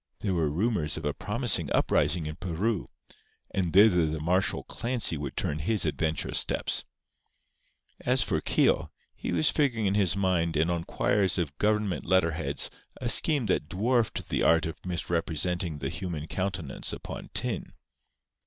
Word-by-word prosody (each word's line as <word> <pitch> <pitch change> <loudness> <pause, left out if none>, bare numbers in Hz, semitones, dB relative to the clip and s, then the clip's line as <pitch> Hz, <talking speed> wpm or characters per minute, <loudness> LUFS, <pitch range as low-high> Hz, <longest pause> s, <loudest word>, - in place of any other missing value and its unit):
There 100 -3 -1
were 80 -4 +1
rumours 85 -2 0
of - - -6
a - - 0
promising - - 0
uprising 85 -3 +2
in 75 0 -5
Peru; 95 +4 -2 0.6
and 90 -3 -1
thither 90 -4 +5
the 80 0 -3
martial 90 +2 0
Clancy 120 -7 0
would 70 -3 -6
turn 75 - -1
his 105 +7 0
adventurous 80 0 0
steps. - - 0 1.1
As - - +2
for - - -1
Keogh, - - +2 0.2
he - - -5
was 85 -3 +3
figuring 125 -7 +1
in 95 - +2
his 100 -2 +2
mind 85 -4 +1
and 80 +3 +2
on 85 -1 -2
quires 100 -4 +1
of 80 -6 -2
Government 105 -3 0
letter 95 -2 +2
heads 80 - +1 0.3
a 120 - -2
scheme 145 -1 +4
that 90 -6 0
dwarfed 115 +4 0
the - - 0
art 80 -1 +4
of 80 0 -7
misrepresenting 85 -1 -2
the 70 -2 -3
human 85 -4 -5
countenance 90 -4 -3
upon - - -7
tin. - - -1
90 Hz, 155 wpm, -28 LUFS, 80-100 Hz, 1.1 s, thither